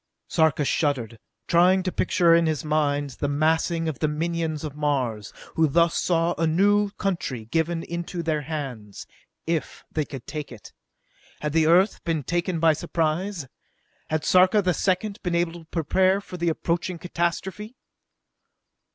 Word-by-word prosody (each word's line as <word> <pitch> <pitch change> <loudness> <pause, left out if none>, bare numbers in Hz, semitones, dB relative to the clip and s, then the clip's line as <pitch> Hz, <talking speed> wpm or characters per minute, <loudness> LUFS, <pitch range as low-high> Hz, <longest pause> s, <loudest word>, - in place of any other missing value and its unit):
Sarka 160 -3 +2
shuddered, 125 -7 -1 0.3
trying 185 +2 +4
to 185 - -1
picture 170 -1 +3
in 170 -1 +4
his 155 -1 -1
mind 145 -2 0
the 145 - +1
massing 160 +3 +1
of 155 -6 -3
the 155 - +1
minions 160 0 -2
of 150 -2 -5
Mars, 130 -8 -1 0.2
who 160 -1 +3
thus 170 +3 +3
saw 170 -1 +1
a 165 - +2
new 205 +5 +3
country 155 - -2
given 165 +6 -1
into 170 0 -5
their 155 -2 0
hands 135 -9 -6 0.4
if 165 -3 -3
they 155 - 0
could 135 -4 -9
take 150 -3 -6
it. 115 -4 -12 0.7
Had 150 -1 -2
the 160 -1 +3
Earth 185 +5 +3
been 160 -4 -1
taken 175 +3 -1
by 160 -1 +5
surprise? 165 +1 -2 0.6
Had 155 0 -1
Sarka 185 +3 +5
the 180 -1 +2
Second 195 +5 -1
been 175 -2 -1
able 170 -1 +1
to 170 -1 -11
prepare 185 +4 +2
for 195 - -10
the 170 -1 0
approaching 170 +2 -2
catastrophe? 180 +6 -3
165 Hz, 155 wpm, -25 LUFS, 150-175 Hz, 0.7 s, by